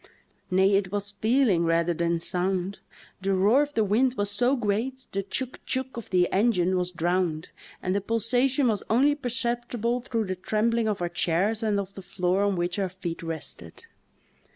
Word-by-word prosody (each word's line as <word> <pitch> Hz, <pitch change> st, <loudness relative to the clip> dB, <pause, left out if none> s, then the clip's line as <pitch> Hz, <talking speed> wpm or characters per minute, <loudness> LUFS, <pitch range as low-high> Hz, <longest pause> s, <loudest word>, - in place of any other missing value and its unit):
Nay, 190 Hz, +2 st, +3 dB
it 195 Hz, -2 st, +1 dB
was 205 Hz, 0 st, -2 dB
feeling 220 Hz, -3 st, +2 dB
rather 170 Hz, +1 st, +2 dB
than 170 Hz, +1 st, 0 dB
sound; 180 Hz, +3 st, -1 dB, 0.4 s
the 195 Hz, 0 st, +1 dB
roar 210 Hz, +9 st, +4 dB
of 290 Hz, 0 st, -3 dB
the 220 Hz, -, +3 dB
wind 245 Hz, +6 st, +2 dB
was 205 Hz, 0 st, 0 dB
so 245 Hz, +6 st, +2 dB
great 245 Hz, +3 st, -2 dB
the 195 Hz, -, -1 dB
"choog, 255 Hz, +6 st, -4 dB
choog" 260 Hz, 0 st, -2 dB
of 235 Hz, -3 st, -7 dB
the 180 Hz, -2 st, +3 dB
engine 190 Hz, -3 st, +2 dB
was 180 Hz, -1 st, 0 dB
drowned 175 Hz, -2 st, -1 dB, 0.3 s
and 185 Hz, -, 0 dB
the 200 Hz, -, 0 dB
pulsation 245 Hz, +6 st, +1 dB
was 215 Hz, -4 st, +1 dB
only 270 Hz, +6 st, +4 dB
perceptible 240 Hz, -2 st, -1 dB
through 230 Hz, -3 st, -2 dB
the 185 Hz, -1 st, -3 dB
trembling 220 Hz, +4 st, 0 dB
of 205 Hz, -4 st, -1 dB
our 175 Hz, -, -1 dB
chairs 180 Hz, +6 st, 0 dB
and 210 Hz, -2 st, +1 dB
of 195 Hz, 0 st, -5 dB
the 195 Hz, -, -9 dB
floor 180 Hz, +1 st, 0 dB
on 200 Hz, -1 st, +2 dB
which 175 Hz, +2 st, -1 dB
our 190 Hz, -2 st, 0 dB
feet 180 Hz, -2 st, -6 dB
rested. 165 Hz, -, -7 dB
200 Hz, 180 wpm, -26 LUFS, 180-235 Hz, 0.4 s, roar